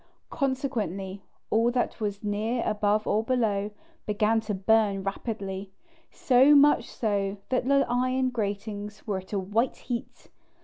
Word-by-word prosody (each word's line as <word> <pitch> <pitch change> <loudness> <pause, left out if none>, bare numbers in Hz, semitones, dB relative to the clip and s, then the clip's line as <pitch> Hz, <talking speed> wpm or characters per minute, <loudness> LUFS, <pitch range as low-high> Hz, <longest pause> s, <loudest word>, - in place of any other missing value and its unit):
Consequently, 225 - -2 0.3
all 230 +2 +3
that 245 -1 -1
was 205 -1 -3
near, 215 +4 -1
above 210 0 +1
or 215 - +1
below, 220 -5 0 0.4
began 215 +1 +2
to 210 -2 -3
burn 200 0 +2
rapidly, 195 -1 -4 0.4
so 265 +3 +5
much 285 -4 +5
so 200 -3 -1
that 255 -1 0
the 275 0 +4
iron 255 +1 +1
gratings 205 -2 -4
were 200 -3 -1
at 185 - -14
a 205 - 0
white 210 +6 0
heat. 240 -2 -6
215 Hz, 135 wpm, -27 LUFS, 200-245 Hz, 0.4 s, so